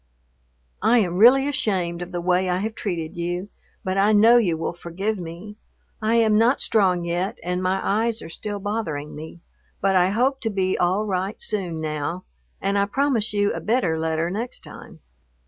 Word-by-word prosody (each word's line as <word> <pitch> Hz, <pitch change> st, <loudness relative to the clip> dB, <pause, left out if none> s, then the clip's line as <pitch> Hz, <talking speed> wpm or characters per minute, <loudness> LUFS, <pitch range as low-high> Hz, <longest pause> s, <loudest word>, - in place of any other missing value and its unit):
I 240 Hz, -, +4 dB
am 180 Hz, -6 st, +1 dB
really 260 Hz, +6 st, +6 dB
ashamed 190 Hz, -11 st, -1 dB
of 175 Hz, +1 st, -6 dB
the 175 Hz, -1 st, -3 dB
way 180 Hz, +1 st, +1 dB
I 180 Hz, -, +1 dB
have 215 Hz, +4 st, -3 dB
treated 170 Hz, -7 st, -4 dB
you, 175 Hz, +3 st, -3 dB, 0.3 s
but 190 Hz, 0 st, -1 dB
I 205 Hz, +2 st, +4 dB
know 225 Hz, +3 st, +7 dB
you 180 Hz, -9 st, +2 dB
will 165 Hz, -, -3 dB
forgive 190 Hz, +5 st, -3 dB
me. 175 Hz, +5 st, -8 dB, 0.4 s
I 220 Hz, +2 st, +1 dB
am 220 Hz, -2 st, +4 dB
not 240 Hz, +4 st, +3 dB
strong 185 Hz, -6 st, +2 dB
yet, 175 Hz, +3 st, -2 dB
and 180 Hz, +1 st, -2 dB
my 185 Hz, +1 st, 0 dB
eyes 225 Hz, +2 st, 0 dB
are -, -, -8 dB
still 205 Hz, +5 st, -5 dB
bothering 195 Hz, -8 st, -4 dB
me, 160 Hz, +2 st, -9 dB, 0.4 s
but 195 Hz, 0 st, +2 dB
I 180 Hz, 0 st, +4 dB
hope 260 Hz, +6 st, +1 dB
to 225 Hz, -, -1 dB
be 190 Hz, -2 st, 0 dB
all 185 Hz, +4 st, +1 dB
right 190 Hz, 0 st, -2 dB
soon 180 Hz, -6 st, -2 dB
now, 155 Hz, +3 st, -3 dB, 0.4 s
and 200 Hz, +1 st, 0 dB
I 200 Hz, -, +3 dB
promise 240 Hz, 0 st, 0 dB
you 205 Hz, -1 st, +1 dB
a -, -, -4 dB
better 200 Hz, -9 st, 0 dB
letter 160 Hz, +1 st, -1 dB
next 230 Hz, +5 st, -4 dB
time. -, -, -12 dB
195 Hz, 185 wpm, -23 LUFS, 175-220 Hz, 0.4 s, know